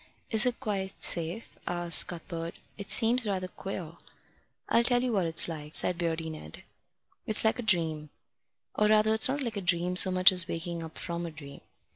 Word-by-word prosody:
"Is 220 +2 +4
it 245 - -3
quite 195 -2 -5
safe?" 170 +6 0
asked 175 -1 +4
Cuthbert. 170 -1 -8 0.2
"It 200 -2 -10
seems 235 0 +3
rather 185 -2 -3
queer." 180 -3 -9 0.7
"I'll 235 - +2
tell 245 0 +1
you 250 -2 -2
what 190 -5 -1
it's 165 - +4
like," 155 -2 -7
said 175 -1 +4
Beardy 165 -1 -3
Ned. 80 - -12 0.6
"It's 220 0 +3
like 220 - 0
a - - -2
dream. 160 -8 -1 0.6
Or 210 - +1
rather 215 0 +2
it's 220 +3 +5
not 280 +1 -3
like 230 -4 -5
a - - -4
dream 180 0 -1
so 185 - +6
much 185 0 +4
as 180 -2 +2
waking 170 0 -5
up 160 -1 -11
from 170 0 -6
a - - -7
dream. 145 -3 -13
180 Hz, 190 wpm, -27 LUFS, 165-215 Hz, 0.7 s, so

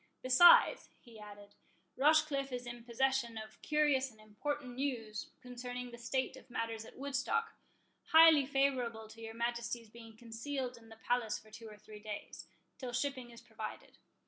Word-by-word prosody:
Besides," 260 +8 +7
he 230 -3 -15
added, 205 -1 -12 0.4
"Rochecliffe 290 -1 +3
is 245 0 -4
in 240 -1 -8
possession 245 -1 0
of 220 0 -9
curious 295 -3 +2
and 220 -3 -20
important 250 +5 -5
news 230 -6 -3
concerning 250 0 -6
the 235 - -10
state 260 +3 -2
of 260 - -15
matters 230 -2 -3
at - - -14
Woodstock, 280 - -1 0.5
highly 320 -4 +7
favourable 255 -5 0
to 225 +1 -13
your 225 0 -7
Majesty's 235 -1 -3
being 225 -1 -13
concealed 245 +3 -5
in 225 -1 -16
the 225 - -12
palace 225 0 -1
for 215 - -17
two 225 0 -10
or 210 - -12
three 210 0 -12
days, 210 -1 -8 0.3
till 250 -2 -5
shipping 255 -1 -2
is 235 0 -13
provided. 220 -3 -9
240 Hz, 160 wpm, -34 LUFS, 225-270 Hz, 0.5 s, Besides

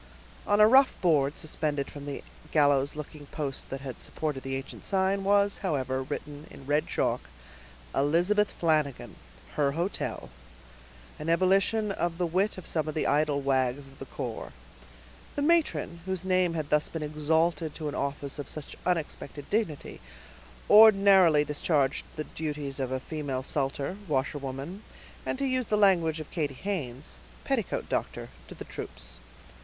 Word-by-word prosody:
On 205 0 +3
a 210 - +9
rough 265 +4 +5
board 150 -5 +2
suspended 150 -3 -2
from 145 -1 -8
the 140 - -5 0.3
gallows 145 -2 +3
looking 150 -1 -8
post 140 -3 -4
that 135 0 -5
had 135 -2 -7
supported 150 -4 -3
the 135 0 -3
ancient 135 +1 -7
sign, 195 0 +1
was, 200 +1 +3
however, 130 -8 -1
written 145 +2 -6
in 135 - -12
red 145 +2 +1
chalk, - - -1 0.6
"Elizabeth 175 +9 +3
Flanagan, 155 -5 0 0.4
her 140 -2 +2
hotel," 170 - -3 0.9
an 155 - -3
ebullition 195 +5 +3
of 175 -3 -1
the 180 - +1
wit 185 +5 0
of 185 - -8
some 155 -2 -1
of 155 - -4
the 155 - 0
idle 145 -1 +2
wags 135 0 0
of 135 0 -17
the - - -7
corps. - - -5 0.8
The 285 - 0
matron, 305 - +2
whose 190 -1 -3
name 185 -2 +2
had 155 -2 -3
thus 150 0 +3
been 165 -2 -4
exalted 155 +1 +1
to 155 - -4
an 145 - -3
office 140 0 -3
of 145 - -5
such 155 -2 -5
unexpected 155 -4 -3
dignity, 205 -9 -2 0.7
ordinarily 195 -7 +7
discharged 145 -2 +1
the 155 - -3
duties 150 -3 -5
of 130 -1 -2
a 130 - -1
female 140 -2 -4
sutler, 140 +5 -2
washerwoman, 140 +4 -3 0.5
and, - - -1
to 275 - -1
use 255 -3 0
the 210 - +2
language 170 -6 +4
of 155 - -8
Katy 145 -5 -2
Haynes, 130 - -5 0.2
petticoat - - -1
doctor - - -3 0.2
to - - -10
the - - -8
troops. - - -7
155 Hz, 155 wpm, -28 LUFS, 140-185 Hz, 0.9 s, a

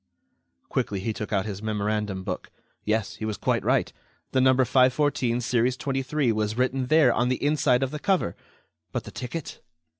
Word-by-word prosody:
Quickly, 100 - -1
he 110 +4 -2
took 105 - -6
out 100 -2 +1
his 100 -2 -5
memorandum 105 -2 -2
book. - - -5 0.3
Yes, 105 -1 -1
he - - -7
was 110 -1 -3
quite - - 0
right. - - +1 0.4
The 130 - +2
No. 130 0 +5
514, 130 -1 +2
series 125 +1 +1
23, 135 -1 0
was 110 0 -1
written 130 0 0
there, 155 -4 +5
on 120 +2 +1
the 130 - +2
inside 145 -4 +3
of 135 - -2
the 150 - -5
cover. 180 - +1 0.6
But - - -3
the - - -10
ticket? 130 +5 -6
125 Hz, 175 wpm, -26 LUFS, 105-130 Hz, 0.6 s, No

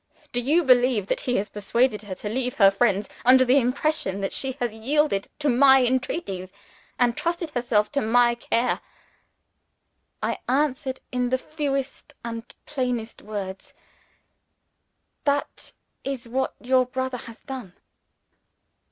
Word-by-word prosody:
Do 245 - 0
you 305 +8 +3
believe 250 -6 +4
that - - -1
he 245 - +2
has 205 - -1
persuaded 210 +2 +1
her 200 -3 -6
to 210 - -6
leave 250 +3 -1
her 195 -2 +6
friends, 200 -1 +1 0.2
under 260 +2 +6
the 255 +3 +5
impression 250 -5 0
that 195 - -2
she 265 -1 -2
has 245 -3 -2
yielded 225 -1 0
to 295 - -2
My 265 0 +6
entreaties, 240 - -2 0.5
and 240 -1 +2
trusted 335 +1 -2
herself 220 -5 +1
to 280 - 0
My 240 +2 +4
care?" 235 +1 0 1.4
I - - -1
answered 265 -1 0
in 250 -1 0
the 260 - +2
fewest 275 -1 -4
and 230 0 -6
plainest 250 -5 -3
words, 195 -3 -6 1.5
"That 285 0 -1 0.3
is 265 -3 -4
what 265 +3 -1
your 255 0 +2
brother 260 0 -3
has 230 -1 -12
done." 255 -10 -7
250 Hz, 135 wpm, -25 LUFS, 220-265 Hz, 1.5 s, her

